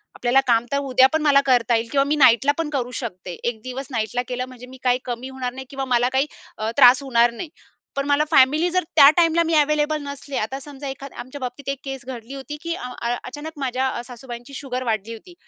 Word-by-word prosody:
आपल्याला 245 Hz, +2 st, +3 dB
काम 235 Hz, -1 st, +3 dB
तर 280 Hz, -, +1 dB
उद्या 260 Hz, -2 st, +4 dB
पण 315 Hz, -, +2 dB
मला 285 Hz, -2 st, +5 dB
करता 245 Hz, -3 st, +3 dB
येईल 230 Hz, 0 st, -1 dB
किंवा 275 Hz, -1 st, +3 dB
मी 295 Hz, -, +1 dB
नाईटला 265 Hz, -1 st, +5 dB
पण 330 Hz, -2 st, -2 dB
करू 255 Hz, -4 st, -2 dB
शकते. 185 Hz, -6 st, -6 dB
एक 230 Hz, -2 st, -2 dB
दिवस 255 Hz, +2 st, -6 dB
नाईटला 235 Hz, +1 st, -1 dB
केलं 250 Hz, 0 st, -3 dB
म्हणजे 250 Hz, -1 st, -12 dB
मी 260 Hz, -, -12 dB
काही 250 Hz, 0 st, +2 dB
कमी 245 Hz, +1 st, -5 dB
होणार 255 Hz, -2 st, -4 dB
नाही 265 Hz, +1 st, -8 dB
किंवा 270 Hz, -1 st, -4 dB
मला 245 Hz, -1 st, +2 dB
काही 270 Hz, +2 st, +2 dB, 0.3 s
अ, 215 Hz, +1 st, -2 dB
त्रास 255 Hz, 0 st, +7 dB
होणार 240 Hz, -3 st, +3 dB
नाही. 305 Hz, +7 st, -7 dB, 0.5 s
पण 275 Hz, 0 st, -1 dB
मला 290 Hz, +1 st, +3 dB
फॅमिली 295 Hz, +6 st, +5 dB
जर, 365 Hz, +1 st, +1 dB
त्या 280 Hz, -, +9 dB
टाईमला 335 Hz, -1 st, +4 dB
मी 330 Hz, -, -1 dB
अव्हेलेबल 300 Hz, +1 st, +1 dB
नसले, 280 Hz, -1 st, -6 dB
आता 260 Hz, +6 st, -3 dB
समजा 280 Hz, 0 st, -9 dB
एखाद 270 Hz, 0 st, -8 dB
आमच्या 260 Hz, +3 st, -8 dB
बाबतीत 255 Hz, +2 st, -5 dB
एक 275 Hz, -1 st, -3 dB
केस 270 Hz, -2 st, -6 dB
घडली 250 Hz, -1 st, -8 dB
होती 275 Hz, +2 st, -7 dB
की 335 Hz, 0 st, -3 dB
अं, 250 Hz, -6 st, -7 dB
अ 235 Hz, +1 st, 0 dB
अचानक 295 Hz, +5 st, -7 dB
माझ्या 260 Hz, -1 st, -1 dB
अ, 250 Hz, -, -3 dB
सासूबाईंची 245 Hz, +1 st, -10 dB
शुगर 255 Hz, -3 st, -4 dB
वाढली 225 Hz, -2 st, -2 dB
होती. 230 Hz, +11 st, -12 dB
260 Hz, 230 wpm, -22 LUFS, 245-280 Hz, 0.5 s, त्या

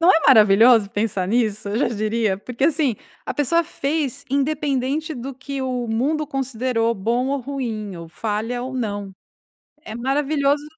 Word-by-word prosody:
Não 340 Hz, +2 st, +6 dB
é 325 Hz, -, +5 dB
maravilhoso 220 Hz, -2 st, +6 dB
pensar 205 Hz, -3 st, -1 dB
nisso, 215 Hz, -2 st, 0 dB
eu 205 Hz, +3 st, -1 dB
já 250 Hz, -, +2 dB
diria. 215 Hz, -2 st, 0 dB
Porque, 245 Hz, +5 st, -3 dB
assim, 295 Hz, -6 st, +2 dB, 0.3 s
a -, -, -2 dB
pessoa 315 Hz, +4 st, +2 dB
fez 280 Hz, -3 st, -2 dB
independente 285 Hz, +1 st, 0 dB
do 260 Hz, +2 st, -6 dB
que 275 Hz, +1 st, -5 dB
o 250 Hz, -2 st, -2 dB
mundo 290 Hz, +7 st, 0 dB
considerou 250 Hz, -4 st, -1 dB
bom 235 Hz, +6 st, 0 dB
ou 280 Hz, 0 st, -1 dB
ruim, 230 Hz, -7 st, -4 dB
ou 170 Hz, -1 st, -9 dB
falha 220 Hz, +6 st, -3 dB
ou 260 Hz, +1 st, -5 dB
não. 205 Hz, -5 st, -3 dB, 0.7 s
É 220 Hz, -, -7 dB
maravilhoso 280 Hz, +3 st, +1 dB
250 Hz, 155 wpm, -22 LUFS, 220-280 Hz, 0.7 s, Não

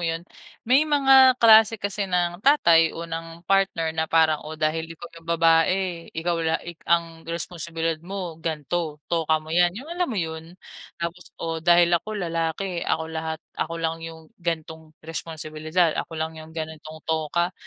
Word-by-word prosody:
yun, 165 Hz, 0 st, -2 dB, 0.4 s
may 255 Hz, +4 st, +5 dB
mga 270 Hz, -3 st, +6 dB
klase 225 Hz, -1 st, +7 dB
kasi 200 Hz, -1 st, -3 dB
ng 175 Hz, 0 st, 0 dB
tatay 170 Hz, -, +5 dB
o 170 Hz, -, -5 dB
ng 165 Hz, +1 st, -7 dB
partner 190 Hz, -5 st, +1 dB
na 160 Hz, 0 st, -2 dB
parang, 160 Hz, -2 st, +3 dB
"oh, 155 Hz, +1 st, -8 dB
dahil 155 Hz, +1 st, -1 dB
ikaw 165 Hz, 0 st, -10 dB, 0.2 s
yung 165 Hz, -, -21 dB
babae, 170 Hz, +2 st, +2 dB
ikaw 165 Hz, +1 st, -2 dB
la 160 Hz, 0 st, +1 dB
ik 175 Hz, -1 st, -9 dB
ang 165 Hz, -1 st, +1 dB
responsibilidad 165 Hz, -1 st, -3 dB
mo, 175 Hz, -2 st, -6 dB
gan'to, 160 Hz, 0 st, -2 dB, 0.2 s
toka 160 Hz, -2 st, +2 dB
mo 155 Hz, 0 st, -7 dB
’yan," 175 Hz, +2 st, +3 dB
yung 295 Hz, +8 st, -7 dB
alam 355 Hz, 0 st, -1 dB
mo 230 Hz, -, -3 dB
yun? 165 Hz, 0 st, -4 dB, 0.4 s
Tapos, 170 Hz, +1 st, -5 dB
o, 165 Hz, -1 st, -3 dB
dahil 175 Hz, +1 st, +5 dB
ako 210 Hz, +5 st, 0 dB
lalaki, 170 Hz, 0 st, -2 dB
ako 160 Hz, -1 st, -1 dB
lahat, 160 Hz, 0 st, -4 dB
ako 165 Hz, +1 st, -3 dB
lang 165 Hz, 0 st, -2 dB
yung 160 Hz, -1 st, -10 dB
gan'tong 160 Hz, -1 st, -5 dB
responsibilidad, 160 Hz, +1 st, -1 dB
ako 165 Hz, -, -8 dB
lang 160 Hz, 0 st, -2 dB
yung 160 Hz, +1 st, -13 dB
ganitong 155 Hz, 0 st, -7 dB
toka. 160 Hz, +3 st, 0 dB
165 Hz, 165 wpm, -24 LUFS, 160-175 Hz, 0.4 s, klase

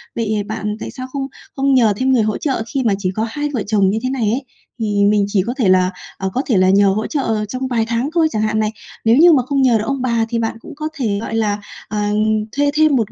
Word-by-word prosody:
Vậy 215 Hz, -2 st, -1 dB
bạn 215 Hz, -1 st, -3 dB
tại -, -, -6 dB
sao 255 Hz, -1 st, -7 dB
không 275 Hz, -1 st, -2 dB, 0.3 s
không 275 Hz, 0 st, +2 dB
nhờ 230 Hz, -5 st, +4 dB
thêm 260 Hz, +2 st, +2 dB
người 235 Hz, -4 st, +3 dB
hỗ 215 Hz, 0 st, -1 dB
trợ 265 Hz, -6 st, -1 dB
khi 270 Hz, -2 st, 0 dB
mà 220 Hz, -4 st, +2 dB
chỉ 185 Hz, -2 st, -1 dB
có 220 Hz, -, 0 dB
hai 295 Hz, +5 st, -3 dB
vợ 230 Hz, -6 st, -1 dB
chồng 200 Hz, -3 st, +3 dB
như 220 Hz, +3 st, 0 dB
thế 255 Hz, -, 0 dB
này 250 Hz, -5 st, 0 dB
ấy? 265 Hz, +3 st, -2 dB, 0.3 s
Thì 205 Hz, -2 st, +1 dB
mình 205 Hz, -1 st, +3 dB
chỉ 200 Hz, -1 st, +1 dB
có 240 Hz, -, -1 dB
thể 225 Hz, -8 st, +2 dB
là, 185 Hz, 0 st, +4 dB, 0.3 s
ờ, 190 Hz, -, -2 dB
có 260 Hz, -, 0 dB
thể 230 Hz, -, +2 dB
là 185 Hz, 0 st, +4 dB
nhờ 200 Hz, +1 st, +5 dB
hỗ 215 Hz, +3 st, -1 dB
trợ 225 Hz, -7 st, -1 dB
trong 255 Hz, +5 st, -4 dB
vài 230 Hz, -3 st, 0 dB
tháng 235 Hz, +4 st, -1 dB
thôi 330 Hz, -2 st, +4 dB
chẳng 215 Hz, -, -1 dB
hạn 215 Hz, 0 st, 0 dB
này, 215 Hz, 0 st, 0 dB, 0.3 s
nếu 230 Hz, +3 st, +5 dB
như 340 Hz, +2 st, +7 dB
mà 260 Hz, -5 st, +3 dB
không 275 Hz, 0 st, 0 dB
nhờ 245 Hz, -3 st, +4 dB
được 210 Hz, -, -2 dB
ông 275 Hz, -1 st, -1 dB
bà 235 Hz, -3 st, +1 dB
thì 230 Hz, 0 st, -1 dB
bạn 225 Hz, 0 st, -2 dB
cũng 305 Hz, -, -11 dB
có 305 Hz, +1 st, -4 dB
thể, 220 Hz, -8 st, -1 dB
gọi 225 Hz, -, -4 dB
là, 210 Hz, -2 st, 0 dB, 0.3 s
ờ, 210 Hz, -, -4 dB, 0.5 s
thuê 285 Hz, +1 st, +1 dB
thêm 305 Hz, -1 st, +4 dB
một 225 Hz, -5 st, 0 dB
225 Hz, 280 wpm, -18 LUFS, 210-265 Hz, 0.5 s, như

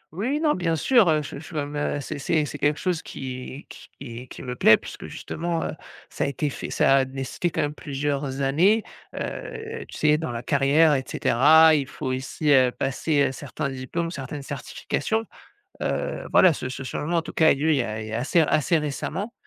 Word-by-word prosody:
Oui, 205 Hz, +7 st, -2 dB
oui, 290 Hz, +3 st, 0 dB
non, 305 Hz, -2 st, +3 dB
bien 165 Hz, -2 st, 0 dB
sûr, 220 Hz, -, +4 dB
heu, 155 Hz, -1 st, +2 dB
j 140 Hz, -, -7 dB
je 160 Hz, 0 st, -11 dB
me 145 Hz, -, -1 dB
mets 145 Hz, 0 st, -5 dB
a 145 Hz, 0 st, -1 dB
c'est, 140 Hz, +1 st, -6 dB
c'est 155 Hz, +1 st, +1 dB
c'est 145 Hz, -, -7 dB
quelque 145 Hz, +1 st, +2 dB
chose 180 Hz, -3 st, -1 dB
qui 130 Hz, +2 st, -7 dB, 0.3 s
qui 125 Hz, -1 st, -8 dB
qui -, -, -10 dB
me 125 Hz, -1 st, -4 dB
plaît 110 Hz, -, +6 dB
puisque -, -, -9 dB
justement, 165 Hz, 0 st, -3 dB
heu, -, -, -2 dB, 0.4 s
ça -, -, -1 dB
a -, -, 0 dB
été 140 Hz, +1 st, -2 dB
fait -, -, -6 dB
ça 135 Hz, -, +4 dB
a 135 Hz, -, +3 dB
nécessité 135 Hz, +6 st, -3 dB
quand -, -, -2 dB
même 145 Hz, 0 st, -2 dB
plusieurs 140 Hz, -1 st, -3 dB
années, 180 Hz, +11 st, +3 dB, 0.3 s
heu, 450 Hz, +1 st, -5 dB
tu -, -, -10 dB
sais 150 Hz, 0 st, +3 dB
dans 160 Hz, -6 st, -3 dB
la 115 Hz, 0 st, -5 dB
carrière 150 Hz, +1 st, +4 dB
et 135 Hz, -2 st, 0 dB
cetera. 155 Hz, +6 st, +5 dB
Il 140 Hz, -4 st, +1 dB
faut 140 Hz, -, -6 dB
aussi, 135 Hz, +3 st, -1 dB
heu, 130 Hz, -2 st, +5 dB
passer, 145 Hz, +4 st, 0 dB
heu, -, -, -5 dB
certains 140 Hz, +1 st, -5 dB
diplômes, 135 Hz, +6 st, -3 dB
certaines 140 Hz, -1 st, -6 dB
certifications. 220 Hz, +10 st, -3 dB, 0.6 s
Heu, -, -, -2 dB
voilà 185 Hz, -3 st, +7 dB
ce 130 Hz, -, -4 dB
ce 130 Hz, +1 st, -6 dB
changement 155 Hz, +5 st, -2 dB
en -, -, 0 dB
tout -, -, -8 dB
cas 160 Hz, -, +3 dB
a -, -, +7 dB
eu -, -, -2 dB
lieu 155 Hz, +3 st, +1 dB
il 150 Hz, -, +4 dB
y -, -, +2 dB
a 110 Hz, 0 st, -4 dB
il 110 Hz, -, -7 dB
y 110 Hz, -, -7 dB
a 115 Hz, -, -1 dB
assez 145 Hz, +7 st, +2 dB
assez 155 Hz, +1 st, +2 dB
récemment 155 Hz, +8 st, -4 dB
145 Hz, 225 wpm, -24 LUFS, 135-165 Hz, 0.6 s, voilà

